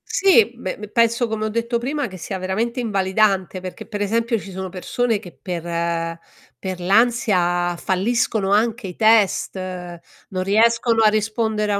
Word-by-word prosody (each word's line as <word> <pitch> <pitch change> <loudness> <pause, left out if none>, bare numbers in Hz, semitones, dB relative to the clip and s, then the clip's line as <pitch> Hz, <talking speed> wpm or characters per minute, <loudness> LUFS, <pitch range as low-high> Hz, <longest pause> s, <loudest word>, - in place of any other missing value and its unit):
Sì. 340 - +4
Beh, 185 -6 -5
p 210 - -8
penso, 235 +1 +2
come 220 -1 -2
ho - - -1
detto 230 +2 -1
prima, 280 +3 -2
che 185 - -10
sia 190 +3 -5
veramente 215 +7 -2
invalidante, 195 -3 +1
perché, 185 -1 -8
per 205 -2 -5
esempio, 230 +3 +1
ci 195 - -10
sono 190 0 -5
persone 220 +5 -1
che 180 - -11
per 170 -1 -3 0.4
per 185 -2 -4
l'ansia 180 -4 +2
falliscono 195 +2 0
anche 220 +2 +1
i 180 -2 -6
test, 220 -4 +3
non 185 0 -7
riescono 230 +3 +3
a 215 - +6
rispondere 215 0 0
a 200 - +1
205 Hz, 160 wpm, -21 LUFS, 185-230 Hz, 0.4 s, a